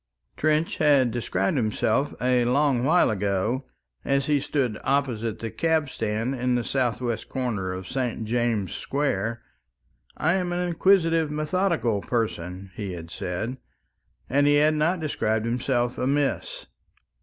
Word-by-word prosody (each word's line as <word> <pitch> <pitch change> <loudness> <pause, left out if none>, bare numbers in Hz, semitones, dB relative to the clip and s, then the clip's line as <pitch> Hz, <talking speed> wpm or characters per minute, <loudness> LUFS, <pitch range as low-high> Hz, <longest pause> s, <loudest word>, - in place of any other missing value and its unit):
Trench 155 +2 +1
had 140 -5 +4
described 105 -1 -1
himself 110 +3 0
a 125 -1 +2
long 130 0 +2
while 160 -1 +4
ago 105 +5 -1 0.4
as 140 0 +1
he 145 -1 +2
stood 130 -6 -1
opposite 125 -6 0
the 115 -1 -5
cab 160 -3 +1
stand 110 +2 -2
in 125 -1 0
the 120 - 0
southwest 120 -3 -1
corner 110 -8 -2
of 95 0 -6
St. 125 -4 -2
James's 115 -4 0
Square: 115 -5 -2 0.7
"I 160 +2 +2
am 180 -2 0
an 180 0 -1
inquisitive, 165 -3 +3
methodical 155 - 0
person," 95 -5 -3
he 100 -2 -5
had 85 -1 -8
said, 110 +11 -4 0.7
and 145 +1 +3
he 145 - +5
had 150 +1 +4
not 160 +4 +1
described 110 -7 0
himself 120 0 0
amiss. 140 +2 -1
125 Hz, 135 wpm, -25 LUFS, 110-145 Hz, 0.7 s, he